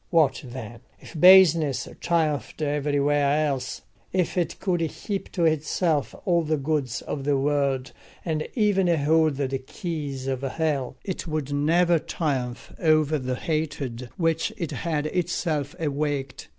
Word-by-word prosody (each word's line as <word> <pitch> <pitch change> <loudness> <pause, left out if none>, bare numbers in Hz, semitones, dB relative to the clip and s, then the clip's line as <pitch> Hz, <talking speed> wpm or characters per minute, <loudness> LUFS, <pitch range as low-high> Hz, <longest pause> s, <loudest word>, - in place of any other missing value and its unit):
What 160 -5 +3
then? 120 -3 -8 0.2
If - - -13
baseness 170 -6 +6
triumphed 160 -5 0
everywhere 145 0 +1
else, 135 -3 -3 0.3
if 185 -3 0
it 175 -2 -1
could 180 -3 0
heap 195 +5 -4
to 170 -3 +1
itself 155 0 +1
all 170 -2 +3
the 155 -1 0
goods 140 -4 -1
of 140 - -4
the 140 0 +2
world 140 -2 0 0.3
and 155 -3 -1
even 205 -5 +3
hold 160 -1 +3
the 135 -1 -2
keys 145 -3 -5
of 135 -1 -2
hell, 140 -2 -1
it 185 -2 -4
would 155 -3 -2
never 165 +4 +3
triumph 130 -7 -3
over 155 -2 +3
the 130 -1 -2
hatred 140 -5 -3
which 165 +3 +1
it 170 -7 -3
had 155 -3 -2
itself 155 -4 -1
awakened. 145 -3 -2
150 Hz, 135 wpm, -25 LUFS, 140-165 Hz, 0.3 s, baseness